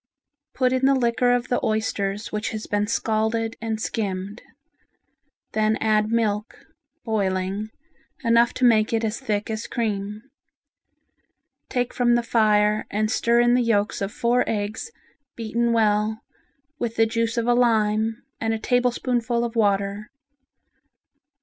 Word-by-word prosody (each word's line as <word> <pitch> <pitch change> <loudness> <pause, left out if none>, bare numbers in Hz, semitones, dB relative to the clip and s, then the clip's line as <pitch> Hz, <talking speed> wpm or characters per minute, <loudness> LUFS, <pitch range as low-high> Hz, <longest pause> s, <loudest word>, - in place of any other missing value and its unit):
Put 255 -1 +2
in 260 +1 +2
the 275 - +4
liquor 245 0 +2
of 245 0 0
the 245 - 0
oysters 210 -2 -1
which 210 +1 -2
has 215 -1 -5
been 205 0 -1
scalded 225 +1 -1
and 225 -1 -2
skimmed. 200 -1 -3 1.1
Then 215 0 +1
add 215 0 +1
milk 215 -2 -1 0.4
(boiling) 195 -1 -1 0.5
enough 235 0 +4
to 255 - +1
make 220 -2 +4
it 225 0 +1
as 220 +1 -2
thick 215 -5 -2
as 220 +1 -4
cream. 210 -2 -3 1.5
Take 245 -1 -1
from 240 -1 +3
the 240 - +1
fire 215 -2 +2
and 215 +1 -1
stir 235 0 +3
in 240 0 +4
the 250 - +3
yolks 210 -4 0
of 195 +1 -2
four 240 +3 +1
eggs 215 - -3 0.5
beaten 235 +1 -1
well 220 -1 +1 0.6
with 230 -1 -3
the 225 - +4
juice 230 +1 -1
of 230 - +1
a 240 - +3
lime 225 -2 +1 0.2
and 225 0 0
a - - -5
tablespoonful 245 0 0
of 235 0 -6
water. 200 -1 0
225 Hz, 140 wpm, -23 LUFS, 210-235 Hz, 1.5 s, the